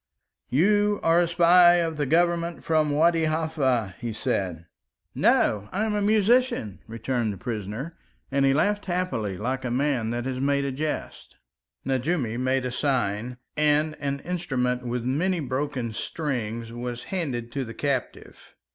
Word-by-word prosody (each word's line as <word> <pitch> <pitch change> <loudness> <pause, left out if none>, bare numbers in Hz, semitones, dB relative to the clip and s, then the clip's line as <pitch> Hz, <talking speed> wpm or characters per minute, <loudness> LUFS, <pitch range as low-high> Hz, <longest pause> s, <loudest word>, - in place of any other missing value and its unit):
"You 205 +7 +3
are 165 +1 +4
a 175 - +2
spy 175 +1 +6
of 165 -2 0
the 145 -2 0
Government 170 0 +1
from 155 -2 +2
Wadi 165 +2 +3
Halfa," 150 - 0
he 120 -2 -4
said. 90 -6 -2 0.5
"No, 105 -1 +2
I 205 +5 0
am 215 - -1
a 210 - 0
musician," 215 - +2
returned 115 0 -2
the 100 - -7
prisoner, 115 - -5 0.4
and 140 0 +2
he 135 - +4
laughed 205 +9 +1
happily, 175 - -2
like 130 +6 -2
a 125 - -2
man 125 -2 0
that 120 +1 -3
has 130 -1 -3
made 140 0 +1
a 140 - -1
jest. 150 +3 -5 0.5
Nejoumi 130 -3 -1
made 130 0 0
a 125 - -2
sign, 125 -3 -1 0.2
and 155 0 +2
an 140 -1 -2
instrument 130 -9 -1
with 120 0 -2
many 170 +8 0
broken 130 -4 -3
strings 115 -6 -3
was 120 0 -5
handed 125 -10 -3
to 135 +2 -2
the 115 -2 -8
captive. 135 -3 -4
135 Hz, 155 wpm, -25 LUFS, 120-165 Hz, 0.5 s, spy